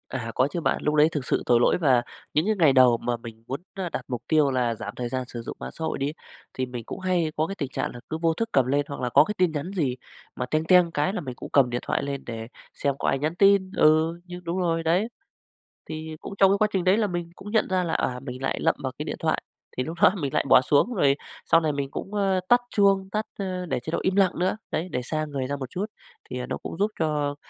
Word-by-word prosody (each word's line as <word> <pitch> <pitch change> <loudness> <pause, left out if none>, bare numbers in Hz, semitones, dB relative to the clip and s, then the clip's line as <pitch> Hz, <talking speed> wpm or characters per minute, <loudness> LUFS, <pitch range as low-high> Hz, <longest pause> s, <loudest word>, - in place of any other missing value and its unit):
À, 115 -3 -4
có 130 - +3
chứ 170 - -3
bạn, 135 - +1
lúc 150 0 +1
lấy 150 +1 +6
thực 145 -5 -3
sự - - 0
tội 120 -1 +4
lỗi 120 - +4
và 130 -8 +3 0.3
những 155 - +2
cái 215 +1 +2
ngày 155 -5 +6
đầu 125 -3 +6
mà 120 +1 -2
mình 115 -1 -11
muốn, 135 +4 -4
ơ, 190 -3 -3
đặt - - -5
mục 125 -3 -4
tiêu 150 -3 +3
là 125 -3 +1
giảm 105 -1 -6
thời 120 -1 -3
gian 130 +1 -2
sử 120 -1 -6
dụng - - -7
mạng - - -6
xã 160 - -8
hội - - -2
đi, 140 +2 -1 0.4
thì 130 - -2
mình 125 -2 -6
cũng - - -6
hay 180 -4 0
có 155 +1 +1
cái 195 - -5
tình 140 -8 -3
trạng - - -3
là 120 - -8
cứ 160 - -2
vô 165 -1 +3
thức 230 +7 -2
cầm 135 -2 +4
lên 140 +3 +1
hoặc 140 - -6
là 125 - 0
có 140 +4 +7
cái 210 - -3
tin 180 -2 +3
nhắn 155 +4 -4
gì 145 -10 0 0.4
mà 125 - -2
"teng 155 +5 0
teng" 180 -1 +5
cái 160 +5 0
là 205 - -2
mình 130 -4 -6
cũng - - -9
cầm 135 -3 +5
điện 120 0 -2
thoại - - 0
lên 140 -1 -4
để 115 -1 -6 0.3
xem 140 -1 -1
có - - -1
ai 135 - +2
nhắn 155 +4 -1
tin. 195 0 +4
Ừ, 160 +2 +4
nhưng 180 0 -9
đúng 170 +1 -3
rồi, 165 -2 0
đấy. 175 +7 +2 0.8
Thì 155 0 -5
cũng - - -7
trong 195 -1 +6
cái 200 - +3
quá 215 - +3
trình 190 -3 0
đấy 185 +3 +4
là 220 -2 +2
mình 175 -2 -4
cũng 205 +2 -9
nhận 220 - +2
ra 185 -1 +1
là, 165 - -2
à, 125 0 0
mình 130 -1 -7
lại 135 - -1
lậm - - +2
vào - - -2
cái - - -3
điện - - -3
thoại, - - 0 0.4
thì 130 - +1
lúc 160 +5 -6
đó - - +8
mình 140 -4 -3
lại - - +1
bỏ - - +8
xuống 145 - +2
rồi 140 -10 +3 0.3
sau 165 - +5
này 155 -2 0
mình 140 -1 -3
cũng, 195 - -6
a, 195 -2 +2
tắt 245 0 +6
chuông, 195 -2 +3
tắt 215 +2 -1
a, 185 -2 -3
để 135 - 0
chế 160 - -6
độ - - 0
im 190 - 0
lặng 195 -3 +3
nữa. 185 +4 +1
Đấy, 170 +4 -2
để 125 - -1
xa 155 +5 -2
người 140 -3 -3
ra 140 - -2
một 130 -3 -6
chút 190 +8 -3 0.4
thì, - - -4
à, - - -3
nó - - -3
cũng - - -7
giúp 205 +2 +1
cho 150 -3 0
155 Hz, 290 wpm, -25 LUFS, 130-185 Hz, 0.8 s, đó